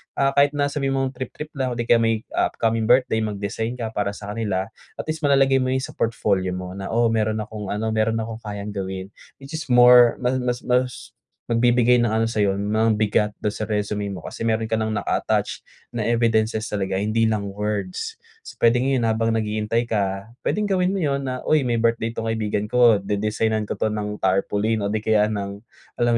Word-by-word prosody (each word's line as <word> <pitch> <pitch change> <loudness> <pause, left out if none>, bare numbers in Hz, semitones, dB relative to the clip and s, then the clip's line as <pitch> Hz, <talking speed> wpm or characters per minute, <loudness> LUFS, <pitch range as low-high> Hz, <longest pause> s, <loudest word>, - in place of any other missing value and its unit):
Ah 135 0 +2
,kahit 145 +1 +5
na 145 0 +1
sabihin 135 -2 -1
mong 135 -1 0
trip-trip 135 +4 -7
lang 130 -2 -1
o - - -6
di 120 - -2
kaya 115 0 +4
may 115 -1 +1
upcoming 115 -1 0
birthday 125 -2 +3
mag-design 110 +2 -3
ka 115 -3 -4
para 105 -2 -2
sa 100 0 -7
kanila, 100 -3 -2 0.3
at - - -5
least 155 0 -4
malalagay 135 -1 +4
mo 130 - 0
yun 130 0 -1
sa - - -5
portfolio 100 -4 0
mo 90 0 -6
na, 95 - -5
o 115 -1 +3
meron 110 -1 0
akong 105 -1 -7
ano, 110 +1 -2
meron 110 +1 +1
akong 115 0 -6
kayang 105 0 -5
gawin, 95 0 -5 0.3
which 135 - -11
is 160 - -6
more 125 -1 +7
ma 125 - +2
mas 125 0 -2
mas 125 0 -1 0.4
magbibigay 120 +1 +3
ng 120 - +1
ano 115 +1 +1
sa'yo 100 -3 0
ng 110 +1 +1
bigat 105 0 +2
dun 105 0 -2
sa - - -3
resume 105 -1 -2
mo, 95 - -6
kasi - - -6
meron 110 0 0
ka 110 - 0
nang 110 0 -1
naka-attach 105 -2 -1 0.3
na 115 - -1
evidences 110 -1 +1
talaga 95 -2 -2
hindi 110 +2 +1
lang 110 -2 0
words. 105 -3 -3 0.2
So, - - -12
pwedeng 120 +2 +4 0.2
habang 115 0 +1
naghihintay 110 +1 -1
ka, 100 -2 -1 0.2
pwedeng 210 0 0
gawin 185 -2 +1
mo 195 - -1
yun 140 -4 0
na, 130 -1 -3
"Uy 155 -2 +3
may 120 -2 0
birthday 115 0 +1
tong 115 -1 -4
kaibigan 105 -2 -1
ko 120 -2 +5
de-designan 105 +2 -1
ko 105 - -5
'to - - +2
ng 105 -1 -3
tarpaulin", 100 +3 +1
o 100 - -1
di 110 - 0
kaya 110 0 +2
ng 100 0 -5 0.3
alam 120 0 +2
110 Hz, 200 wpm, -23 LUFS, 105-120 Hz, 0.4 s, more